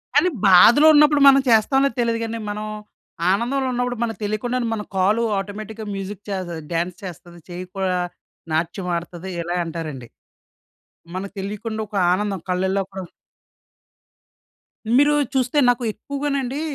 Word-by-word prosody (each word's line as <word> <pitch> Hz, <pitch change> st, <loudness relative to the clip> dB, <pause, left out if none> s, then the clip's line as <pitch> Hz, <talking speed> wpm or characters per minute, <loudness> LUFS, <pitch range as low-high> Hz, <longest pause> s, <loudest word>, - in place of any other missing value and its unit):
కానీ 365 Hz, -, +5 dB, 0.2 s
బాధలో 235 Hz, -, +7 dB
ఉన్నప్పుడు 295 Hz, -1 st, +5 dB
మనం 275 Hz, 0 st, +7 dB
చేస్తాంలేదో 265 Hz, +3 st, +3 dB
తెలీదు 230 Hz, -1 st, +1 dB
గానీ, 225 Hz, 0 st, -4 dB
మనం 210 Hz, +1 st, -4 dB, 0.7 s
ఆనందంలో 255 Hz, +6 st, 0 dB
ఉన్నప్పుడు 245 Hz, 0 st, -1 dB
మనకు 225 Hz, -4 st, -3 dB
తెలియకుండానే 240 Hz, +4 st, -1 dB
మన 215 Hz, -, -3 dB
కాలు 205 Hz, +5 st, +2 dB
ఆటోమేటిక్‌గా 215 Hz, +2 st, -6 dB
మ్యూజిక్ 195 Hz, +1 st, -6 dB
చేస 190 Hz, -2 st, -3 dB, 0.2 s
డాన్స్ 170 Hz, +2 st, -1 dB
చేస్తది. 175 Hz, -1 st, -9 dB
చెయ్యి 180 Hz, +1 st, -6 dB
కూడా 185 Hz, -2 st, 0 dB, 0.5 s
నాట్యమాడతది 175 Hz, +2 st, -3 dB
ఇలా 175 Hz, +1 st, -3 dB
అంటారండి. 155 Hz, -7 st, -6 dB, 1.1 s
మనకు 195 Hz, +2 st, -5 dB
తెలీకుండా 215 Hz, +3 st, -5 dB
ఒక 210 Hz, -, -7 dB, 0.2 s
ఆనందం 195 Hz, -1 st, -1 dB
కళ్ళల్లో 190 Hz, +2 st, 0 dB
కూడా 190 Hz, 0 st, -6 dB, 2.0 s
మీరూ 290 Hz, +1 st, +5 dB, 0.2 s
చూస్తే 255 Hz, +2 st, +1 dB
నాకు 245 Hz, 0 st, +1 dB
ఎక్కువగానండి 280 Hz, +2 st, -3 dB
210 Hz, 120 wpm, -22 LUFS, 185-245 Hz, 2.0 s, బాధలో